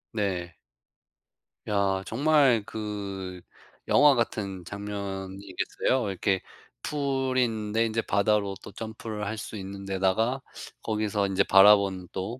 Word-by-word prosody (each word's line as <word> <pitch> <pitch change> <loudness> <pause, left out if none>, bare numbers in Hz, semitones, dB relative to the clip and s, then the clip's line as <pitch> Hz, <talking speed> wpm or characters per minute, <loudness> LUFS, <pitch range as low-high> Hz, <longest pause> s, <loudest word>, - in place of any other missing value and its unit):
네. 90 -5 -2 1.1
야 100 -2 +1
정말 135 -3 +3
그 100 -4 -5 0.5
영화 145 -1 +6
같은 100 -6 -2
장면이겠어요. 100 +3 -3
이렇게 95 0 0 0.4
풀인데 130 -6 0
인제 115 0 0
바다로 100 -1 +1
또 - - -9
점프를 110 -1 -6
할 110 +2 -3
수 110 - -7
있는 100 0 -7
데다가 95 +7 +1 0.4
거기서 105 -2 0
인제 95 -1 +2
바라보는 95 -2 +5
또 105 +7 -4
105 Hz, 230 characters per minute, -27 LUFS, 95-115 Hz, 1.1 s, 영화